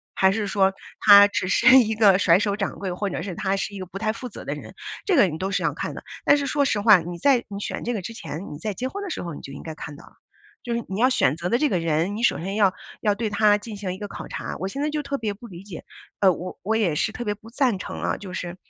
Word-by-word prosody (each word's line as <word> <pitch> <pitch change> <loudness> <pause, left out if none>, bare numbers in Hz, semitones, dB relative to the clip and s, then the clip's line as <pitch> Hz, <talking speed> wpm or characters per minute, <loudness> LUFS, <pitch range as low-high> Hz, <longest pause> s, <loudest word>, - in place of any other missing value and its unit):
还 190 0 +4
是 210 +1 -1
说 195 -1 +2 0.3
他 205 -1 +9
只 200 - -2
是 260 +7 +7
一 220 -3 +1
个 200 -4 +5
甩 170 -2 +5
手 205 -1 0
掌 195 -2 -3
柜， 190 -2 -3
或 200 +3 -2
者 180 - -4
是 190 -1 -5
他 190 +2 0
是 205 - -3
一 200 - -7
个 185 - -5
不 185 +2 -9
太 215 0 0
负 245 +2 -7
责 - - -10
的 - - -2
人， - - -11 0.3
这 390 - +2
个 265 -10 +6
你 155 -2 -4
都 190 +1 -2
是 - - 0
要 - - +1
看 - - -5
的。 - - -9 0.2
但 290 - +6
是 280 - -2
说 285 +1 +1
实 225 -6 +1
话， 210 -3 +7
你 175 +1 -6
在 260 +4 +3
你 200 - -6
选 - - -4
这 240 - -2
个 210 - -3
之 230 - -6
前， 160 -7 -7
你 145 - -9
在 210 +4 -3
结 250 +7 -3
婚 405 +8 -6
的 400 - -5
时 - - -4
候 170 -2 -5
你 - - -9
就 135 - -9
应 140 - -9
该 160 - -6
看 150 -1 -8
到 160 - -14
了， - - -19 0.5
就 240 - -3
是 235 - -2
你 195 +2 -3
要 255 - +5
选 150 - +2
择 175 +2 -3
的 235 - +3
这 295 +3 +2
个 185 - +1
人， 165 +4 0
你 - - -4
首 - - +3
先 190 +4 -4
要 200 -3 +3 0.3
要 210 -1 +2
对 220 +1 -2
他 205 0 +4
进 210 0 -8
行 195 -2 -4
一 - - -8
个 205 - -6
考 - - -8
察。 - - -5
我 190 - -2
现 270 +9 -5
在 300 - 0
就 300 0 -1
特 280 0 -3
别 215 -5 -2
不 225 +4 -12
理 180 -3 -11
解， 195 -5 -9 0.4
呃， 195 -2 +6
我 180 +1 -6
我 220 +3 0
也 205 -8 +1
是 215 - 0
特 240 - -5
别 210 - 0
不 220 +2 -15
赞 245 -5 +1
成 - - -6
啊， - - -1
就 190 -3 -9
是 175 -1 -5
205 Hz, 335 characters per minute, -24 LUFS, 185-230 Hz, 0.5 s, 他